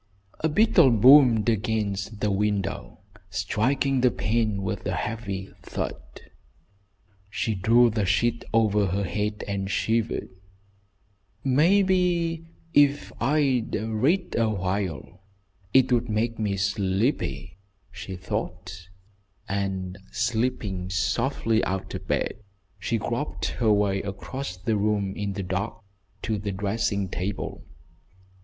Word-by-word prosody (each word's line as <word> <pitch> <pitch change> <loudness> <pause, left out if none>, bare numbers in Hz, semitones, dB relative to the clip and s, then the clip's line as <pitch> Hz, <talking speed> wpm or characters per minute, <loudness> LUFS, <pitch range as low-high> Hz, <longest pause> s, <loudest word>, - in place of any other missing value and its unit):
A 160 - +1
beetle 170 -3 +5
boomed 120 -1 +6
against 105 -2 -1
the 105 - +1
window, 100 0 -2 0.3
striking 125 +9 0
the 125 - +5
pane 110 -3 0
with 95 - -3
a - - -1
heavy 100 -4 -4
thud. - - -4 1.3
She 110 +1 -1
drew 115 +5 +4
the 105 -3 -1
sheet 115 +4 +1
over 105 -3 +3
her 100 +3 -1
head 105 +3 -2
and 100 -1 -2
shivered. 115 +2 0 1.1
"Maybe 170 +2 +2 0.3
if 145 0 +3
I'd 135 -3 +1
read 120 - 0
awhile 95 - -2 0.5
it 130 -1 +4
would 120 -1 +2
make 110 +1 -1
me 100 -3 -1
sleepy," 100 +2 -1 0.3
she 95 +1 -7
thought, 95 -2 -5 0.6
and, 95 -1 -3
slipping 115 -6 -1
softly 115 +3 0
out 95 0 -3
of - - -6
bed, - - -1 0.4
she 115 +4 -1
groped 120 +6 -3 0.2
her 110 -2 +4
way 100 -2 +2
across 100 +3 -6
the 110 +4 -1
room 100 -2 0
in 100 -1 -3
the 100 0 -4
dark 100 +5 -3 0.4
to 110 -2 -1
the 100 0 -3
dressing 100 0 -1
table. 95 +3 -4
105 Hz, 115 wpm, -26 LUFS, 95-120 Hz, 1.3 s, boomed